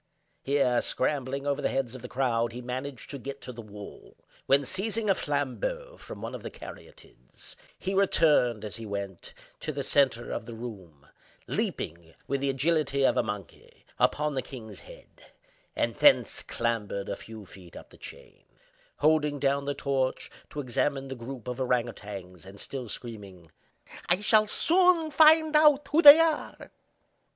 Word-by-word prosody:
Here, 135 -3 +2
scrambling 135 0 -1
over 140 -1 -1
the - - 0
heads 130 -3 -2
of 130 - -9
the 125 - -7
crowd, 120 -3 0
he 120 - -6
managed 130 +1 -6
to 140 - -6
get 140 +2 -7
to - - -7
the 120 -1 -9
wall; 105 -2 -12 0.3
when, 140 +1 +4
seizing 215 - 0
a - - +6
flambeau - - -3
from - - -10
one - - -5
of - - -7
the - - -6
Caryatides, - - -13 0.2
he 190 - -3
returned, 150 - +3
as 105 - -6
he 115 - -8
went, 100 -3 -6 0.2
to 155 - -4
the 140 -1 -4
centre 130 -4 +1
of - - -4
the 115 - -7
room—leaped, 85 -4 -7
with 140 0 -1
the 140 - 0
agility 140 0 +1
of - - +3
a - - +3
monkey, 105 -4 -8
upon 150 0 +1
the 130 - -1
kings 120 -6 -10
head, - - -16 0.5
and - - 0
thence 290 -2 +4
clambered 110 -4 -3
a - - -3
few 110 -2 -11
feet 90 -2 -14
up - - -12
the - - -15
chain; - - -13 0.6
holding 150 -1 +3
down 140 0 0
the 145 0 -2
torch 135 -2 -2 0.2
to 150 - -5
examine 135 +1 -1
the 135 - -5
group 125 0 -8
of 125 +1 -4
ourang 125 -2 +1
outangs, 95 -6 -9
and 95 +1 -12
still 130 -4 -6
screaming: 100 -9 -8 0.6
"I 175 +3 +3
shall 215 0 +4
soon 340 - +3
find 315 0 +6
out 300 -2 +5
who 310 +3 +3
they 295 0 +11
are!" 325 -2 -1
135 Hz, 165 wpm, -28 LUFS, 115-155 Hz, 0.6 s, they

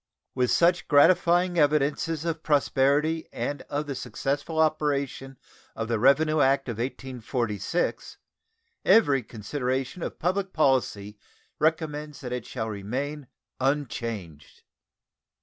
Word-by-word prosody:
With 125 -1 +1
such 175 +1 +3
gratifying 175 +3 +4
evidences 150 +2 +1
of 165 -2 -2
prosperity 150 +2 +2
and 145 - -3
of 145 +1 -2
the 145 - -4
successful 145 +4 -3
operation 145 -4 0 0.4
of 115 0 -4
the 115 -2 0
revenue 150 +5 +4
act 135 0 +3
of 115 -2 -4
1846, 125 - -3 0.7
every 145 - +5
consideration 130 - -3
of - - -5
public 190 +2 -1
policy 115 -8 0 0.4
recommends 150 -1 -1
that 125 -2 -5
it 125 -2 -5
shall 110 -3 -4
remain 130 +8 -4 0.3
unchanged. 115 - -3
140 Hz, 110 wpm, -26 LUFS, 125-155 Hz, 0.7 s, every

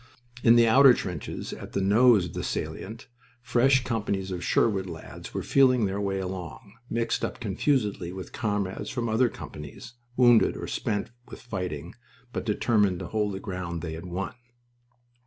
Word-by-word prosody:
In 115 0 +7
the 120 -1 +6
outer 130 +2 +7
trenches, 90 -6 -5
at - - -9
the - - 0
nose 105 +1 +5
of 90 - -8
the - - -3
salient, 110 +3 -5 0.4
fresh 125 +2 +3
companies 100 -6 -2
of 90 -1 -4
Sherwood 95 -2 +2
lads 80 -1 -9
were - - -2
feeling 130 -4 +4
their 100 +1 -2
way 100 -1 -1
along, 90 -3 -6 0.2
mixed 115 0 -1
up - - -3
confusedly 105 -4 0
with 95 0 -8
comrades 100 -4 -2
from 120 -2 -2
other 115 +3 +3
companies, 75 - -9 0.2
wounded 120 -3 +5
or - - -5
spent 105 +1 -2 0.2
with - - -10
fighting, 90 -8 -5 0.4
but - - -4
determined 105 -3 +2
to 90 -1 -6
hold 105 -2 -1
the - - -5
ground 90 -4 -5
they 80 -2 -4
had 80 +2 -7
won. 90 +2 -4
100 Hz, 165 wpm, -27 LUFS, 95-115 Hz, 0.4 s, In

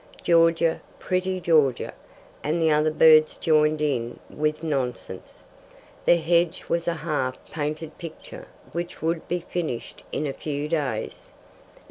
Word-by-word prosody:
"Georgia, 165 -1 +3 0.2
pretty 185 0 -1
Georgia," 155 -8 +2 0.5
and 155 +3 0
the 160 -1 +3
other 150 +1 +3
birds 155 0 +6
joined 155 -1 +2
in 120 -5 -1
with 155 +1 -1
nonsense. 125 - -4 0.6
The 175 - +6
hedge 170 +1 +1
was 170 0 -1
a 170 - +1
half 130 -5 -1
painted 155 +1 -4
picture 165 -2 -9 0.2
which 170 -1 -5
would 165 0 -1
be 175 0 -1
finished 165 -9 -4
in 150 - -2
a 140 - -2
few 145 0 -4
days. 140 -9 -3
155 Hz, 130 wpm, -25 LUFS, 150-170 Hz, 0.6 s, birds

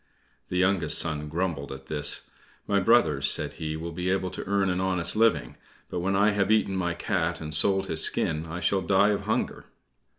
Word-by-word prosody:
The 90 - -3
youngest 90 -2 +2
son 75 -1 +1
grumbled 80 -4 -3
at 65 0 -9
this. 75 0 -1 0.4
"My 100 -1 +1
brothers," 80 - +3
said - - +3
he, 80 0 -5
"will 85 +1 -6
be 90 +2 -3
able 95 -1 -1
to - - -6
earn 100 -1 +1
an 90 +1 -2
honest 95 -1 0
living; 115 +1 +1 0.3
but - - -3
when 95 +2 -1
I 105 +2 +3
have 100 0 0
eaten 105 -3 +2
my 85 -2 -2
cat 85 -4 -2
and 75 -1 -6
sold 95 +5 +3
his 80 -4 +1
skin 80 +2 0
I 85 +3 -6
shall 95 +3 +1
die 95 +3 +3
of 105 - -2
hunger." - - -2
90 Hz, 200 wpm, -26 LUFS, 80-95 Hz, 0.4 s, brothers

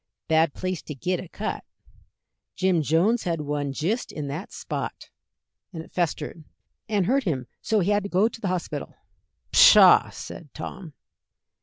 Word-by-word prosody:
"Bad 160 -2 +2
place 185 -2 -3
to 150 - -8
git 180 +6 -1
a 180 - -9
cut. 210 +4 -4 0.9
Jim 185 -3 +2
Jones 175 - +2
had 165 -3 -1
one 145 -1 -2
jist 175 - -2
in 145 -2 -5
that 160 +9 -6
spot, - - -6 0.6
and 165 -4 -7
it - - -18
festered, 170 -1 -2 0.5
and 205 -4 +1
hurt 265 +5 +1
him 135 -8 -1 0.2
so 220 -2 +1
he 190 +4 +1
had 205 0 +2
to - - -4
go 195 +4 +3
to 225 0 -9
the 200 - -2
hospital." 170 -5 -4 0.6
"Pshaw!" - - +8
said 160 - -9
Tom. 175 -6 -8
175 Hz, 160 wpm, -25 LUFS, 155-200 Hz, 0.9 s, Pshaw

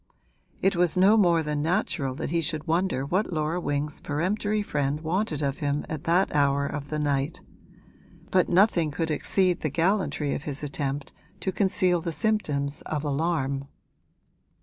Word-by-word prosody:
It 195 0 +3
was 175 0 +2
no 195 +4 +6
more 175 -6 +4
than 150 -1 -2
natural 145 -5 -1
that 145 - -4
he 170 0 +1
should 155 -1 -2
wonder 170 -4 0
what 190 +7 0
Laura 160 +2 -1
Wing's 145 -1 -2
peremptory 205 +7 -1
friend 145 -4 -1
wanted 160 -2 -1
of 140 0 -1
him 145 0 -1
at 155 +1 -5
that 175 +4 +2
hour 140 -1 +3
of 145 0 -5
the 155 - -2
night; 145 +1 -1 0.9
but 185 -1 +3
nothing 175 -3 +4
could 160 +2 -2
exceed 180 +4 +1
the 155 - 0
gallantry 165 -2 0
of - - -3
his 145 -1 -5
attempt 140 -1 -3 0.3
to 190 - -1
conceal 185 -2 +2
the 165 0 -3
symptoms 150 -10 0
of 155 -2 -2
alarm. 140 -2 -1
155 Hz, 160 wpm, -26 LUFS, 145-180 Hz, 0.9 s, no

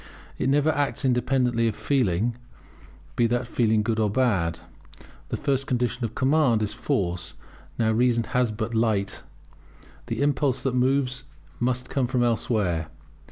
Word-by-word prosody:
It 130 - +1
never 145 +3 +3
acts 145 -1 -1
independently 125 -2 +2
of 110 - -1
feeling, 110 -2 0 0.8
be 120 - +3
that 120 +2 0
feeling 110 -2 +1
good 110 0 -1
or 110 -1 +2
bad. 100 -8 +1 0.7
The - - -2
first 135 -1 -1
condition 125 -1 -1
of 115 - -3
command 130 -5 +3
is 105 - -2
force; 85 -3 -2 0.4
now 110 -1 +2
reason 120 +1 +2
has 125 +1 0
but 110 +2 -4
light; 110 -3 0 0.9
the - - -1
impulse 140 -2 +1
that 135 - 0
moves 130 0 +1
it 140 -2 -26
must 125 +1 -1
come 130 -3 +1
from 125 -1 +1
elsewhere. 105 -9 0
120 Hz, 150 wpm, -25 LUFS, 110-130 Hz, 0.9 s, never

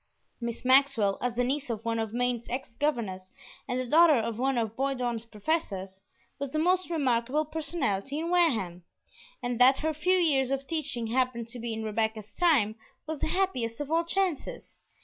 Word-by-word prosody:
Miss 235 0 -5
Maxwell, 255 -7 +4
as 245 -1 -1
the 245 - +1
niece 275 +2 -2
of 225 -1 -4
one 230 0 0
of 220 -1 -2
Maine's 245 0 -1
ex 250 -1 -4
governors 215 -11 -2 0.4
and 250 - -1
the 255 - -2
daughter 315 +4 +6
of 230 -1 -1
one 265 0 +1
of 225 -2 -1
Bowdoin's 250 -4 -1
professors, 200 - -3 0.4
was 280 -1 -3
the 310 - -3
most 360 +3 +2
remarkable 270 -2 +1
personality 290 - -2
in 335 +2 -2
Wareham, 220 - +2 0.6
and 245 -1 -2
that 260 +2 +7
her 315 - +1
few 360 +5 +2
years 280 -7 +3
of 275 0 -2
teaching 275 -7 -2
happened 235 0 -1
to 245 - -6
be 235 0 -4
in 220 0 -4
Rebecca's 220 0 -2
time 260 -12 +3 0.3
was 310 -1 -4
the - - -1
happiest 260 -12 0
of 290 +1 -4
all 330 +1 +3
chances. 380 - -2
255 Hz, 180 wpm, -28 LUFS, 230-310 Hz, 0.6 s, that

